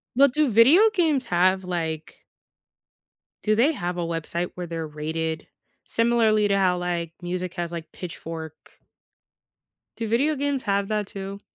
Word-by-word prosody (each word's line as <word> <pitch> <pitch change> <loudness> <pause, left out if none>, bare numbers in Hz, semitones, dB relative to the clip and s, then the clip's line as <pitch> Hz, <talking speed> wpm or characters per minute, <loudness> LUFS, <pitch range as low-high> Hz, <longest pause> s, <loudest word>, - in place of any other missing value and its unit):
No, 280 +3 +7
do 290 +1 +1
video 290 - +7
games 315 - +2
have, 185 +2 +2
like 165 -3 -4 1.2
Do 215 0 +3
they 260 +8 +4
have 180 - -3
a 175 - -1
website 170 +1 -3
where 180 -1 -5
they're 165 -1 -4
rated 160 +1 -4 0.4
similarly 225 -2 +3
to 200 -1 +2
how, 185 -2 +3
like, 175 -2 -2
music 180 0 -4
has, 175 -2 -3
like, 170 -1 -7
Pitchfork? 160 -3 -8 1.2
Do 230 - -3
video 275 +8 +2
games 280 -1 -1
have 200 -1 0
that 210 -2 -1
too? 195 0 -7
185 Hz, 145 wpm, -25 LUFS, 170-230 Hz, 1.2 s, No